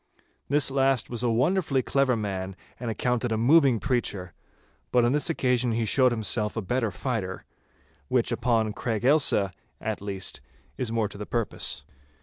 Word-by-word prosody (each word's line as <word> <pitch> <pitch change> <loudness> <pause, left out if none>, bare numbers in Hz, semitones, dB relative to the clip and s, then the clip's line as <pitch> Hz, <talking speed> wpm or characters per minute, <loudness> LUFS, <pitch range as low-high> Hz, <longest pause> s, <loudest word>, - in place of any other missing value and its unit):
This 145 0 +4
last 135 -3 +1
was 120 -2 -1
a 120 - +1
wonderfully 135 +3 +1
clever 135 -3 +2
man 95 -3 -4 0.2
and 120 -1 -4
accounted 125 +2 -1
a 110 - +1
moving 135 0 +4
preacher; 105 -9 -2 0.6
but 125 -1 +4
on 120 - +2
this 150 +4 +2
occasion 125 -6 +1
he 115 0 0
showed 130 +3 +3
himself 110 -1 -1
a - - 0
better 120 +3 0
fighter—which 95 - -4
upon 110 -3 +1
Craig 115 0 -3
Ailsa, 135 -9 +4 0.3
at 110 -2 -4
least, 100 -2 -4 0.3
is 120 - -2
more 115 -2 +1
to 100 - -10
the 105 - -6
purpose. 110 - -1
120 Hz, 155 wpm, -26 LUFS, 105-130 Hz, 0.6 s, This